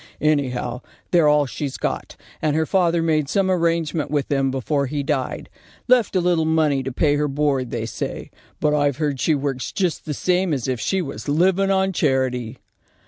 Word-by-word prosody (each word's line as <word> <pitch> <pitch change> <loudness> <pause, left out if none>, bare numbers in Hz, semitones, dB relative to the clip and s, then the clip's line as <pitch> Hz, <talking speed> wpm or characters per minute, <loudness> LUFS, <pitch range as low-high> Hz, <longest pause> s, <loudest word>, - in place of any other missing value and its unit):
Any 150 -3 +2
how, 125 0 -4 0.3
they're 170 -4 +5
all 150 -1 +4
she's 140 +1 -5
got, - - -3 0.3
and 150 -1 +1
her 160 0 +2
father 170 -2 +2
made 155 -3 +1
some 190 +1 +1
arrangement 165 -3 0
with 145 -2 -1
them 135 -1 +1
before 140 +2 -1
he 145 +1 -2
died. 140 -3 -2 0.4
Left 245 -5 +3
a - - +4
little 175 -2 +2
money 155 -3 +2
to 135 +1 -4
pay 145 +3 +2
her 150 0 +1
board, 135 -3 0
they 115 -2 -3
say, 115 - -5 0.3
but 150 -1 +2
I've 145 -3 +1
heard 145 -4 -1
she 155 - +2
works 135 -2 -3
just 180 -5 -1
the 150 - -3
same 180 0 +1
as 130 -3 -4
if 130 -2 -1
she 190 - 0
was 135 -4 -6
living 190 +6 +2
on 190 0 +2
charity." 130 -5 0
150 Hz, 195 wpm, -22 LUFS, 135-170 Hz, 0.4 s, they're